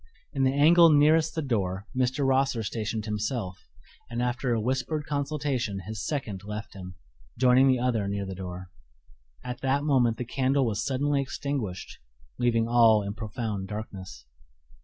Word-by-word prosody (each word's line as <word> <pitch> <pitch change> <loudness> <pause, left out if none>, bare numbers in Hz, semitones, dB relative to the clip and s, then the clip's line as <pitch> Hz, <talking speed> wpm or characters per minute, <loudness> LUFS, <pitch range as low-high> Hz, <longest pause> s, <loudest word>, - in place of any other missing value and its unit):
In 140 - -1
the 130 - +3
angle 165 +4 +7
nearest 155 +2 +4
the 160 - -1
door 100 -7 -1
Mr. 130 +2 +1
Rosser 135 -3 +2
stationed 110 0 -3
himself, 105 -3 -3 0.5
and 120 0 -4
after 125 +1 -1
a 115 - +1
whispered 130 +6 -1
consultation 140 -8 -2
his 110 -3 -5
second 110 -10 -3
left 105 +1 -6
him, 90 -2 -9 0.4
joining 130 +2 +5
the 130 -1 +4
other 120 -5 0
near 100 0 -2
the 95 - -5
door. 90 -1 -7 0.7
At 125 0 -6
that 135 +2 +1
moment 125 -6 +2
the 125 - -4
candle 135 +2 +1
was 110 -2 -1
suddenly 140 +1 0
extinguished, 135 -8 -4 0.4
leaving 115 -2 +2
all 115 -3 +5
in 100 0 -4
profound 110 -3 -4
darkness. 100 - -8
120 Hz, 155 wpm, -27 LUFS, 105-135 Hz, 0.7 s, angle